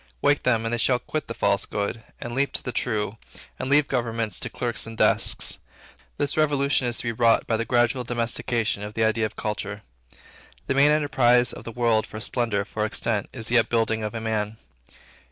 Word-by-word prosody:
Wake 145 Hz, -, +3 dB
them, 115 Hz, -3 st, +1 dB
and 115 Hz, -, -1 dB
they 120 Hz, -, 0 dB
shall 125 Hz, +1 st, +3 dB
quit 155 Hz, +4 st, -4 dB
the -, -, -4 dB
false -, -, +1 dB
good, 105 Hz, +2 st, -3 dB, 0.2 s
and 120 Hz, -, -6 dB
leap 140 Hz, +2 st, 0 dB
to -, -, -2 dB
the 125 Hz, -, -3 dB
true, 110 Hz, -3 st, -2 dB, 0.4 s
and 130 Hz, -, -3 dB
leave 145 Hz, 0 st, +4 dB
governments 115 Hz, -4 st, -2 dB
to -, -, -4 dB
clerks 120 Hz, -2 st, -2 dB
and 115 Hz, 0 st, -8 dB
desks. -, -, +3 dB, 0.6 s
This 145 Hz, -, 0 dB
revolution 140 Hz, -4 st, +2 dB
is 120 Hz, -, 0 dB
to -, -, -1 dB
be 115 Hz, -, -1 dB
wrought 115 Hz, 0 st, +3 dB
by 115 Hz, -, 0 dB
the 115 Hz, +1 st, -1 dB
gradual 120 Hz, +1 st, +2 dB
domestication 115 Hz, -2 st, -1 dB
of 105 Hz, +1 st, -7 dB
the 115 Hz, -, +1 dB
idea 110 Hz, 0 st, +2 dB
of 110 Hz, -, -16 dB
Culture. 105 Hz, -1 st, -4 dB, 0.8 s
The -, -, 0 dB
main 140 Hz, +2 st, +5 dB
enterprise 125 Hz, -5 st, +3 dB
of -, -, -10 dB
the 115 Hz, -, -5 dB
world 115 Hz, -2 st, +1 dB
for 110 Hz, -, -8 dB
splendor, 110 Hz, -3 st, -1 dB
for 105 Hz, -, -3 dB
extent, 110 Hz, -1 st, -1 dB
is 110 Hz, -, -5 dB
the 120 Hz, 0 st, +5 dB
upbuilding 115 Hz, -1 st, +1 dB
of 105 Hz, +1 st, -4 dB
a -, -, -2 dB
man. 110 Hz, -1 st, -2 dB
115 Hz, 205 wpm, -25 LUFS, 110-125 Hz, 0.8 s, main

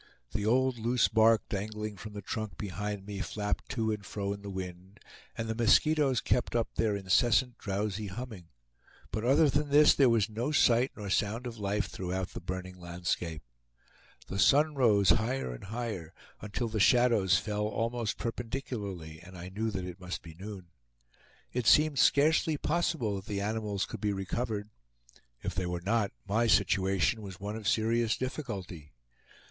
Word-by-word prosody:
The 105 Hz, 0 st, -2 dB
old 130 Hz, +1 st, +2 dB
loose 120 Hz, +2 st, +2 dB
bark 110 Hz, -1 st, +4 dB
dangling 105 Hz, +1 st, -4 dB
from 105 Hz, +2 st, -9 dB
the 105 Hz, -1 st, -7 dB
trunk 110 Hz, +1 st, -4 dB
behind 105 Hz, +1 st, -4 dB
me 100 Hz, -1 st, -6 dB
flapped 105 Hz, +1 st, -3 dB
to 110 Hz, -3 st, 0 dB
and 105 Hz, -1 st, -4 dB
fro 100 Hz, +1 st, -3 dB
in 100 Hz, -, -9 dB
the 100 Hz, -, -7 dB
wind, 95 Hz, +1 st, -7 dB, 0.4 s
and 115 Hz, -, -3 dB
the 110 Hz, -, -1 dB
mosquitoes 135 Hz, +4 st, +3 dB
kept 125 Hz, -, 0 dB
up 115 Hz, -1 st, +1 dB
their 110 Hz, -2 st, +1 dB
incessant 115 Hz, +5 st, +2 dB
drowsy 100 Hz, +1 st, -2 dB
humming; 100 Hz, -3 st, -7 dB, 0.6 s
but 110 Hz, -, -2 dB
other 140 Hz, +6 st, +5 dB
than 145 Hz, +1 st, 0 dB
this, 150 Hz, +1 st, +7 dB
there 135 Hz, -3 st, +5 dB
was 115 Hz, -3 st, +3 dB
no 115 Hz, +6 st, -2 dB
sight 125 Hz, -3 st, +4 dB
nor 100 Hz, -3 st, -5 dB
sound 110 Hz, +5 st, 0 dB
of 115 Hz, -2 st, -6 dB
life 100 Hz, 0 st, 0 dB
throughout 95 Hz, 0 st, -4 dB
the -, -, -8 dB
burning 90 Hz, +1 st, -6 dB
landscape. 85 Hz, -3 st, -3 dB, 0.8 s
The 95 Hz, +10 st, -5 dB
sun 150 Hz, +6 st, +5 dB
rose 105 Hz, -9 st, +4 dB
higher 115 Hz, -, 0 dB
and -, -, -9 dB
higher, 105 Hz, -7 st, -5 dB, 0.3 s
until 105 Hz, +3 st, -3 dB
the 110 Hz, -1 st, -2 dB
shadows 110 Hz, -5 st, +4 dB
fell 105 Hz, +2 st, -2 dB
almost 115 Hz, +1 st, -2 dB
perpendicularly, 115 Hz, -9 st, -5 dB
and 95 Hz, +1 st, -12 dB
I 90 Hz, +1 st, -7 dB
knew 110 Hz, +4 st, -2 dB
that 95 Hz, -3 st, -4 dB
it 90 Hz, +1 st, -8 dB
must 90 Hz, 0 st, -5 dB
be 80 Hz, -1 st, -10 dB
noon. 95 Hz, 0 st, -9 dB, 0.8 s
It 125 Hz, -2 st, -1 dB
seemed 150 Hz, -3 st, +5 dB
scarcely 155 Hz, +3 st, +4 dB
possible 150 Hz, -10 st, 0 dB
that 95 Hz, -, -8 dB
the 100 Hz, -1 st, -2 dB
animals 105 Hz, -1 st, -1 dB
could -, -, -8 dB
be 105 Hz, -1 st, +1 dB
recovered. 105 Hz, +2 st, -3 dB, 0.7 s
If -, -, -2 dB
they 90 Hz, -1 st, -2 dB
were 90 Hz, 0 st, -2 dB
not, 105 Hz, +2 st, +1 dB, 0.2 s
my 115 Hz, +3 st, +2 dB
situation 100 Hz, 0 st, +2 dB
was 95 Hz, -3 st, -9 dB
one 100 Hz, +2 st, -4 dB
of 110 Hz, -3 st, -5 dB
serious 115 Hz, 0 st, +2 dB
difficulty. 100 Hz, -, -5 dB
105 Hz, 170 wpm, -30 LUFS, 95-120 Hz, 0.8 s, this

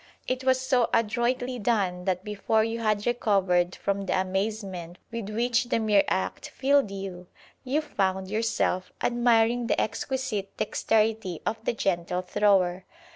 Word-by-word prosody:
It 255 Hz, 0 st, -1 dB
was 260 Hz, 0 st, +3 dB
so 255 Hz, -2 st, +2 dB
adroitly 240 Hz, +3 st, 0 dB
done 195 Hz, -5 st, 0 dB
that 185 Hz, -1 st, 0 dB
before 210 Hz, +1 st, +1 dB
you 225 Hz, +1 st, -2 dB
had 215 Hz, -2 st, 0 dB
recovered 195 Hz, -7 st, +2 dB
from 200 Hz, -1 st, -2 dB
the 185 Hz, -, +1 dB
amazement 190 Hz, -2 st, -3 dB
with 230 Hz, -3 st, -5 dB
which 235 Hz, +2 st, +1 dB
the 240 Hz, -, 0 dB
mere 215 Hz, -3 st, +3 dB
act 190 Hz, -, -2 dB
filled 275 Hz, -3 st, +2 dB
you, 190 Hz, -2 st, -7 dB, 0.4 s
you 275 Hz, +4 st, 0 dB
found 190 Hz, -10 st, -1 dB
yourself 205 Hz, -3 st, 0 dB
admiring 240 Hz, 0 st, +3 dB
the -, -, +1 dB
exquisite 225 Hz, -3 st, -2 dB
dexterity 215 Hz, -5 st, 0 dB
of 220 Hz, 0 st, -2 dB
the -, -, +1 dB
gentle 180 Hz, -3 st, -1 dB
thrower. 185 Hz, -1 st, +2 dB
215 Hz, 140 wpm, -27 LUFS, 190-235 Hz, 0.4 s, was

